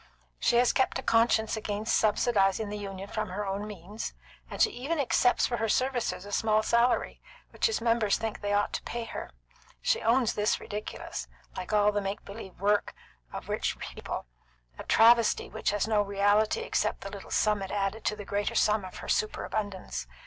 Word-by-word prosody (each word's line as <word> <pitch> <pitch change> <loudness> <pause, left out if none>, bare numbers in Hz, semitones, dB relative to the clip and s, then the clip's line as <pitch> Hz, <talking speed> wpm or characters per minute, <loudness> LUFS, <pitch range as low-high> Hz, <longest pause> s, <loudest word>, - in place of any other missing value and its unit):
She - - +2
has 245 +1 +4
kept 260 - +1
a 265 - -5
conscience 225 -1 +3
against 215 0 -1
subsidising 210 -1 +2
the 210 - -3
Union 195 -1 -6
from 215 -1 -3
her 205 +3 -3
own 200 +2 -3
means; 205 +1 -7 0.3
and - - -7
she - - +5
even 280 +7 -3
accepts 245 -2 +3
for 240 - -1
her 225 0 -1
services 250 -6 0
a 205 - -9
small 215 +1 +2
salary, 235 +2 +2 0.3
which - - +1
its 445 - -1
members 230 -3 +2
think 225 -1 -4
they 205 0 -2
ought 205 0 +1
to - - -2
pay 235 0 -4
her. 230 - -6 0.5
She - - +1
owns 235 +1 +3
this 210 0 +1
ridiculous, 205 - -6 0.3
like 185 - -5
all 210 0 +4
the 205 0 -1
make 195 +1 -4
believe 200 -2 -9
work 205 +1 +1 0.4
of - - -7
rich - - -1
people; - - -6 0.5
a - - -5
travesty 230 0 +5
which - - -1
has 205 +1 0
no 215 -2 +3
reality 205 - +2
except 465 - -1
the - - -7
little - - -9
sum 210 -2 +2
it 195 - -4
added 205 +2 -2
to 210 - +1
the 205 -1 -8
greater 205 +1 -1
sum 210 -1 +3
of 185 - -8
her - - -9
superabundance. 205 - -2
210 Hz, 190 wpm, -29 LUFS, 200-230 Hz, 0.5 s, she